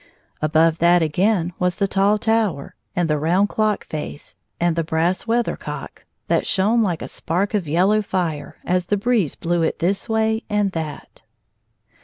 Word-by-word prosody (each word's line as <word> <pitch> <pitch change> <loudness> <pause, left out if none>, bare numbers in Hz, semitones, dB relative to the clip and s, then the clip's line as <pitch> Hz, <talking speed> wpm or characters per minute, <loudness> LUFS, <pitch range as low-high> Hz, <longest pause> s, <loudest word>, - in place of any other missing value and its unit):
Above 160 +1 +3
that, 175 0 +5
again, 175 +2 +1
was 180 -1 +1
the 200 - 0
tall 195 +2 +2
tower, 220 -9 0 0.2
and 175 -1 +1
the 150 -1 0
round 180 +7 +2
clock 215 -1 0
face, 150 -1 -7 0.2
and 175 -1 +1
the 165 - 0
brass 165 +5 0
weather 235 +1 +1
cock, - - -8 0.2
that - - +2
shone 215 +5 +2
like 180 -7 -1
a - - -5
spark 185 +6 -2
of 200 -6 -1
yellow 190 +8 +3
fire 170 -7 -3
as 180 0 0
the 205 - +1
breeze 210 - +1
blew 170 0 -1
it 160 - 0
this 195 +6 -1
way 220 0 +1
and 210 -2 +1
that. 155 -4 -6
180 Hz, 170 wpm, -21 LUFS, 165-210 Hz, 0.2 s, that